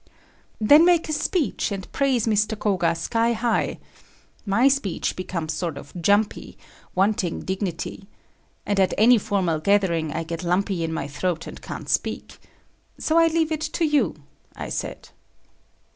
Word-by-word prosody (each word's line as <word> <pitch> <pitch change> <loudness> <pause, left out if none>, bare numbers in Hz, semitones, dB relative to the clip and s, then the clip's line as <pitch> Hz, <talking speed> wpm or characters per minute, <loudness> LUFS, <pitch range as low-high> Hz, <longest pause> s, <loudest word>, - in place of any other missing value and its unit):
"Then 290 +9 +7
make 345 -1 +4
a - - 0
speech 300 - -1
and 195 -2 -6
praise 265 -5 +1
Mr. 215 0 +1
Koga 175 -6 +1
sky 230 +8 0
high. 230 0 0 0.7
My 230 +7 +4
speech 275 -10 0
becomes 170 -4 -4
sort 160 -2 -3
of 140 0 -11
jumpy, 205 +4 +1 0.4
wanting 190 -2 +1
dignity. 190 0 -4 0.6
And 205 -1 0
at 190 - +2
any 235 +2 +6
formal 190 -7 0
gathering, 170 -4 +1
I 165 - -3
get 165 0 -5
lumpy 180 0 0
in 165 - -2
my 160 - -3
throat, 165 +4 -2
and - - -9
can't - - -7
speak. - - -2 0.6
So 320 +1 +2
I 330 - +6
leave 325 -1 +1
it 310 -1 -2
to 315 +2 -1
you," 290 - +2 0.4
I - - -6
said. - - -5
200 Hz, 150 wpm, -24 LUFS, 170-245 Hz, 0.7 s, Then